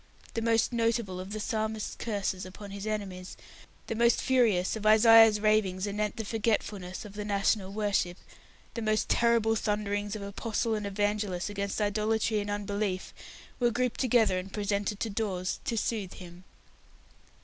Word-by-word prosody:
The 230 - -2
most 230 +1 +2
notable 230 -5 0
of 185 +2 -7
the 215 - -4
Psalmist's 220 0 -2
curses 200 -4 -3
upon 195 +2 -9
his 200 +1 -6
enemies, 190 -4 -4 0.5
the - - -3
most 235 +1 +3
furious 225 -9 +2
of 220 - -6
Isaiah's 220 0 +7
ravings 210 -3 +2
anent 210 0 -2
the 225 - -3
forgetfulness 205 -4 -2
of 205 - -10
the 210 0 -5
national 200 -1 0
worship, 200 -4 0 0.6
the 230 - -4
most 215 -1 0
terrible 230 -1 +3
thunderings 205 -1 -1
of 210 - -6
apostle 220 +3 -2
and 210 -1 -2
evangelist 205 -2 -1
against 200 0 -3
idolatry 215 +1 +1
and 205 0 -4
unbelief, 205 -2 -2 0.5
were 240 -1 +3
grouped 250 +1 -1
together 225 -7 +3
and 190 +2 -8
presented 205 0 -1
to 225 - -1
Dawes 195 -4 -2
to 230 - -1
soothe 210 -4 -2
him. 180 0 -12
210 Hz, 155 wpm, -29 LUFS, 200-220 Hz, 0.6 s, Isaiah's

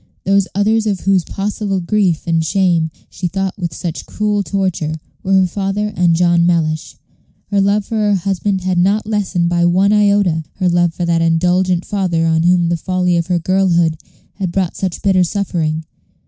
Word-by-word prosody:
Those 195 0 +2
others 215 +2 +1
of 195 -4 -1
whose 195 -2 +2
possible 200 0 -3
grief 180 -2 0
and 165 -1 +1
shame 170 -2 +1 0.2
she 180 - -3
thought 195 +1 -2
with 175 -3 -4
such 165 +1 -6
cruel 210 -1 -1
torture 185 -5 -2 0.3
were 195 - -1
her 190 -1 +5
father 200 +3 -2
and 170 -1 +3
John 170 0 +3
Mellish. 160 -3 0 0.6
Her 200 -1 +2
love 200 +1 +1
for 225 - -3
her 210 -1 +2
husband 195 +1 -1
had 180 -1 0
not 200 +4 +2
lessened 200 -5 -1
by 175 0 +1
one 190 +4 +3
iota 200 -6 +2
her 185 -2 0
love 175 -1 +1
for 175 - -2
that 170 -1 +1
indulgent 180 +2 +1
father 180 -5 0
on 160 0 +2
whom 175 0 +3
the 170 - 0
folly 180 0 0
of 170 0 0
her 180 -1 +1
girlhood 175 -2 +1 0.4
had 190 -3 -3
brought 185 -1 -1
such 185 -3 -4
bitter 190 -3 +3
suffering. 165 -5 -2
185 Hz, 180 wpm, -16 LUFS, 170-200 Hz, 0.6 s, her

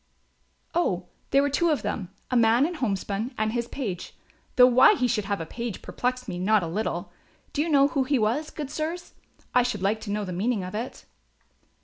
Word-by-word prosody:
"Oh, 185 - 0 0.2
there 275 +1 +4
were 285 - +1
two 340 +4 +2
of 300 - +1
them, 185 -5 -3 0.2
a - - +1
man 235 +3 +5
in 350 - -2
homespun 215 - -2
and 215 0 0
his 235 -1 -1
page, 205 -12 -5 0.4
though 250 - +9
why 255 - +7
he 250 - +1
should 215 -4 0
have 200 0 -1
a 165 - -4
page 235 +4 -5
perplexed 250 0 -2
me 180 -3 -4
not 205 +1 +3
a - - -2
little. 205 +7 -3 0.4
Do 290 - +1
you 330 - 0
know 280 -2 +5
who 275 -3 +1
he 280 +1 +2
was, 240 +8 0
good 290 -3 -6
sirs, 335 +3 -4 0.4
I 250 - +6
should 240 -6 -2
like 215 +3 +1
to 205 - -5
know 210 0 -1
the 185 - -5
meaning 205 +3 0
of 180 +1 -6
it?" 230 +4 -5
240 Hz, 215 wpm, -26 LUFS, 205-275 Hz, 0.4 s, though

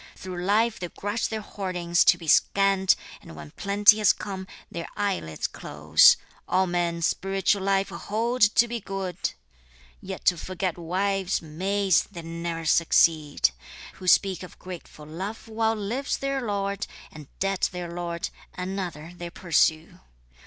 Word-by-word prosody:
Through 180 -1 -6
life 215 +4 +2
they 175 - -4
grudge 205 +6 -2
their 220 -1 -3
hoardings 180 -4 0
to 180 - +6
be 170 -2 -10
scant, 195 +3 +4 0.3
And 80 - -12
when 75 -1 -10
plenty 205 +2 +4
has 210 - +5
come, 190 -2 -6 0.2
their 170 0 -5
eyelids 190 - -2
close. 75 +1 +4 0.3
All 190 +1 +2
men 175 -1 -1
spiritual 195 +3 +1
life 195 0 +1
hold 230 +4 -2
to 210 +3 +5
be 235 0 -3
good, 195 -3 -4 0.7
Yet - - -7
to 180 - +4
forget 185 0 -3
wives, 190 +2 -1
maids, 190 +4 +1
they 170 - -8
ne'er 165 0 -4
succeed! 155 - +3 0.5
Who 185 - -9
speak 190 +1 +4
of 180 - -10
grateful 175 -4 -10
love 190 +9 -6
while 225 0 0
lives 225 +7 -2
their 275 0 -2
lord, 200 -3 -2 0.2
And 150 -3 -11
dead 195 -1 0
their 175 -2 -6
lord, 170 +1 -3 0.3
another 180 -3 -5
they 175 -1 -6
pursue. 165 -2 +1
185 Hz, 145 wpm, -26 LUFS, 170-200 Hz, 0.7 s, to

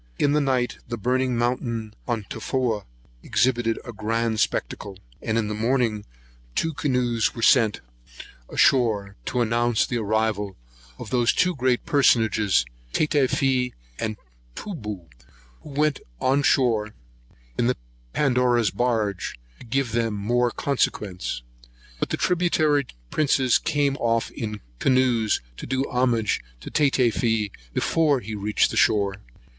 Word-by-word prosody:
In 145 - +2
the 150 - +3
night, 130 -3 0
the 120 0 -4
burning 125 +2 0
mountain 115 -2 -1
on 115 -4 -1
Tofoa 115 -2 -2 0.4
exhibited 120 -2 +1
a 120 - -7
very 110 - -18
grand 115 +1 0
spectacle; 100 -1 -2 0.2
and 110 - -1
in 110 -2 0
the 105 - -3
morning 115 -1 0 0.5
two 165 0 0
canoes 125 -5 0
were 115 - -4
sent 115 -3 +4 0.7
on - - -9
shore, 105 -6 +3
to 125 - 0
announce 120 0 +2
the 120 - -2
arrival 105 -2 -1 0.4
of - - -8
those 120 -2 +3
two 180 0 +1
great 130 -2 +1
personages, 110 - +3 0.3
Tatafee 135 -3 +1 0.2
and 110 -1 -2 0.4
Toobou, 105 - -6 0.5
who - - -12
went 150 0 +1 0.2
on 135 +2 +2
shore 115 -6 +2 0.6
in 120 - +3
the 125 - +1 0.3
Pandora's 125 - +2
barge, 110 -4 -1 0.2
to 125 - -13
give 130 0 0
them 115 -1 0
more 120 +4 +1
consequence; 100 - -2 0.6
but - - -1
the - - -1
tributary 155 -6 +2 0.2
princes 135 -4 +3
came 145 -3 +1
off 115 -2 0
in 105 -2 -5 0.2
canoes, 125 -4 +2 0.2
to - - -7
do 130 +1 0
homage 120 -4 +1 0.2
to - - -8
Tatafee 115 -6 +2 0.2
before 155 -4 +2
he 110 -1 -7
reached 105 0 +1
the - - -4
shore. 100 -3 +3
120 Hz, 135 wpm, -24 LUFS, 110-130 Hz, 0.7 s, sent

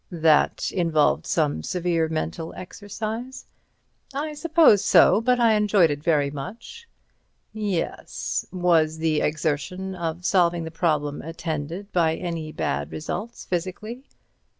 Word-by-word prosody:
"That 160 -3 +2
involved 165 -5 +1
some 75 +2 +1
severe 170 - 0
mental 160 +1 -4
exercise?" 220 +7 -6 0.7
"I 300 +2 -2
suppose 310 - +4
so. 215 - +6
But 250 +1 +2
I 230 -2 +5
enjoyed 205 -6 +4
it 145 0 -4
very 145 -3 +2
much." 225 - -8 0.7
"Yes. 205 -6 -3
Was 165 -4 +2
the 160 -1 +1
exertion 160 +5 -2
of 170 -1 -4
solving 175 -3 +2
the 160 - -6
problem 155 -3 0
attended 165 +4 -5
by 165 -2 +2
any 165 -3 -4
bad 70 - -2
results 205 +8 -5
physically?" 190 +8 -4
175 Hz, 120 wpm, -24 LUFS, 160-205 Hz, 0.7 s, so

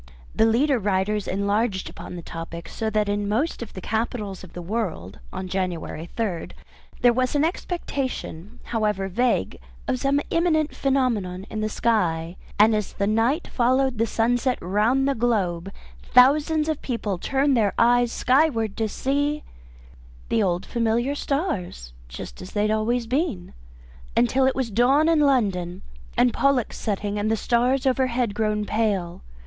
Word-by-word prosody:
The 220 - +4
leader 260 +4 +3
writers 205 +1 0
enlarged 200 +1 0
upon - - -9
the 170 - -7
topic. 165 +1 -7
So 220 -1 -3
that 215 -1 +1
in 205 0 -1
most 255 +10 0
of 235 - -7
the 185 - -7
capitals 215 -2 -3
of 185 - -12
the 175 - -6
world, 180 - -4
on 185 - -5
January 180 -3 -3
3rd, 195 -8 -2 0.5
there 245 -1 +5
was 255 +3 0
an 290 - +3
expectation, 265 - -4
however 210 -4 -1
vague, 225 - 0 0.3
of 255 - 0
some 275 +2 +2
imminent 315 -3 +1
phenomenon 225 -9 0
in 215 - -3
the 215 - -1
sky; 175 -8 0 0.2
and 215 +2 +6
as 210 -2 -2
the 200 - -1
night 230 - +1
followed 255 0 +1
the 230 - +2
sunset 245 +3 +1
round 215 +9 +1
the 280 - +2
globe, 195 -7 0 0.3
thousands 300 - +4
of 315 -2 -1
men 210 -6 -2
turned 275 +4 +1
their 210 -4 +2
eyes 240 0 +4
skyward 250 -6 +2
to 220 -2 0
see 285 +5 -1 0.9
the 225 - +2
old 180 -2 0
familiar 235 +3 0
stars 275 - -3
just 60 +1 -9
as 185 - -9
they 205 - +1
had 215 - +1
always 230 +3 0
been. 250 - -2 0.6
Until 255 +3 +3
it 265 - +1
was 255 -4 -2
dawn 265 +8 +4
in 330 -2 +4
London 200 -11 +1 0.3
and 245 -1 +4
Pollux 275 -4 +1
setting 205 -1 -2
and 210 +1 0
the 225 - +1
stars 245 +4 +1
overhead 255 -4 +1
grown 210 0 0
pale. 200 -6 -1
225 Hz, 155 wpm, -24 LUFS, 200-260 Hz, 0.9 s, and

